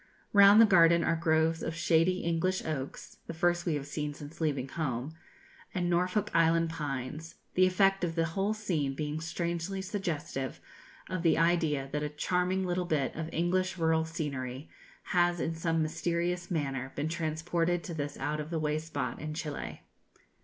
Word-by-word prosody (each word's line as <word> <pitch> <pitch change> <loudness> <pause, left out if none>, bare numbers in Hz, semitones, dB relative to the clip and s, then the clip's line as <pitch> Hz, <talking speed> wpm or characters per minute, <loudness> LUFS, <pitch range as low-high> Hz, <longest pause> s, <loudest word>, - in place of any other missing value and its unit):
Round 200 +1 +8
the 230 - +9
garden 170 -4 +5
are - - +2
groves 160 0 +2
of 160 - -3
shady 170 +2 +2
English 170 +3 0
oaks 140 -4 -5
(the 165 - -5
first 175 +1 +1
we 160 - +2
have 140 -1 -3
seen 150 0 -4
since 145 +3 -10
leaving 140 -4 0
home) 135 -1 -3 0.6
and 175 -1 0
Norfolk 180 +4 +1
Island 165 0 +3
pines, 150 +1 -5 0.2
the 185 0 +5
effect 195 +1 +3
of 165 -2 -1
the 165 -1 +2
whole 195 +6 -1
scene 160 -11 -1
being 150 +1 -3
strangely 170 +3 -3
suggestive 170 - -3 0.5
of 185 -2 -3
the 165 -1 +3
idea 160 -4 +2
that 150 - -1
a 150 - -2
charming 180 +5 0
little 180 0 -1
bit 150 -7 0
of 160 0 -4
English 185 +2 0
rural 160 -1 +2
scenery 140 -4 -5 0.4
has 175 -1 +3
in 160 - -1
some 165 0 0
mysterious 170 +2 -1
manner 135 -5 -2
been 145 +2 -1
transported 165 +1 -1
to 170 - -6
this 145 -2 -4
out 150 +1 -2
of 150 0 -5
the 165 - -2
way 155 -1 0
spot 160 0 -4
in 155 0 -5
Chili. 155 -3 -5
165 Hz, 170 wpm, -30 LUFS, 150-175 Hz, 0.6 s, the